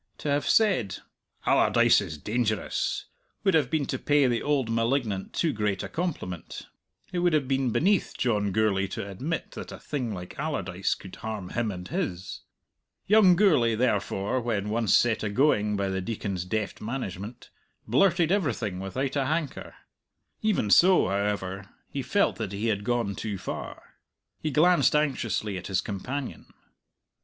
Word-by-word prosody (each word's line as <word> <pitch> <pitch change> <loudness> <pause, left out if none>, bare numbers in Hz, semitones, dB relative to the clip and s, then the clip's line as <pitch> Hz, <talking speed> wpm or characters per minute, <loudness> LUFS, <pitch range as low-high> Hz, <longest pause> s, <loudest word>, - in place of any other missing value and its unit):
To 150 - -4
have 145 0 +1
said 160 - +3 0.5
"Allardyce - - +4
is 80 - -6
dangerous" 110 +4 -1 0.4
would 195 -2 +3
have 150 -6 +3
been 155 -1 0
to - - -3
pay 145 -1 +3
the 120 -2 +1
old 145 -4 +1
malignant 115 -3 0
too 160 -4 0
great 105 -2 -1
a - - -4
compliment; 150 - -4 0.5
it 180 - -1
would 175 -1 +2
have 145 -4 +2
been 135 -1 +1
beneath 195 - +1
John 105 -5 +1
Gourlay 100 -1 +1
to - - -4
admit 135 - -4
that - - -8
a - - -7
thing 130 -6 -3
like 90 -3 -8
Allardyce 95 - -1
could 95 - -11
harm 110 -5 -5
him 115 -2 -1
and 90 -3 -6
his. 120 - -4 0.6
Young 200 -3 +6
Gourlay, 150 - +4
therefore, 105 0 0
when 105 -3 -2
once 115 -1 +3
set 120 -2 +2
agoing 105 -2 +2
by 100 -1 -1
the 95 0 -2
Deacon's 100 -3 -3
deft 105 +2 -3
management, 110 -1 -6 0.4
blurted 170 - +3
everything 120 - 0
without 130 +9 -3
a 135 -2 +1
hanker. 155 -1 -3 0.7
Even 205 - +1
so, 185 - +6
however, 100 -1 -2 0.2
he 140 - -3
felt 200 +9 +1
that 105 -4 -4
he 105 +3 -1
had 100 -2 -1
gone 120 -3 0
too 105 0 -4
far. 90 - -7 0.4
He 155 - -2
glanced 165 +3 +4
anxiously 115 -9 0
at 90 - -8
his 95 -2 +1
companion. 125 +9 -5
115 Hz, 155 wpm, -27 LUFS, 100-145 Hz, 0.7 s, Young